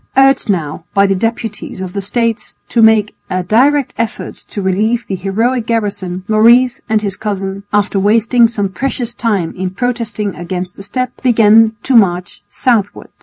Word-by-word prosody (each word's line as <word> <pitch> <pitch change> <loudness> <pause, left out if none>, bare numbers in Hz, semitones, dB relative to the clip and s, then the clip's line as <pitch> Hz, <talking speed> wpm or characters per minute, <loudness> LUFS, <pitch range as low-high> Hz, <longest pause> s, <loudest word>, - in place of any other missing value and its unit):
Urged 270 -3 +4
now 165 -5 -2
by 200 0 +5
the 195 - +2
deputies 225 0 -4
of 185 -1 -6
the 200 - -3
States 230 +3 -1
to 235 - +2
make 220 -2 +4 0.2
a 185 -1 -1
direct 265 +8 +2
effort 230 0 -3
to - - -9
relieve 210 +5 0
the - - -5
heroic 220 +6 -1
garrison, 200 -5 -2
Maurice 235 +3 +4
and 215 -1 +1
his 200 -2 -2
cousin, 195 -2 -4
after 205 -1 +1
wasting 230 +4 +3
some 205 -4 -2
precious 240 +3 -3
time 200 -8 -1
in 185 0 -3
protesting 215 -2 -2
against 180 +1 -5
the - - -10
step, 255 +6 -2
began 225 -2 +4
to 265 - +1
march 180 -5 +2
southward. 225 -5 -1
215 Hz, 165 wpm, -14 LUFS, 195-235 Hz, 0.2 s, by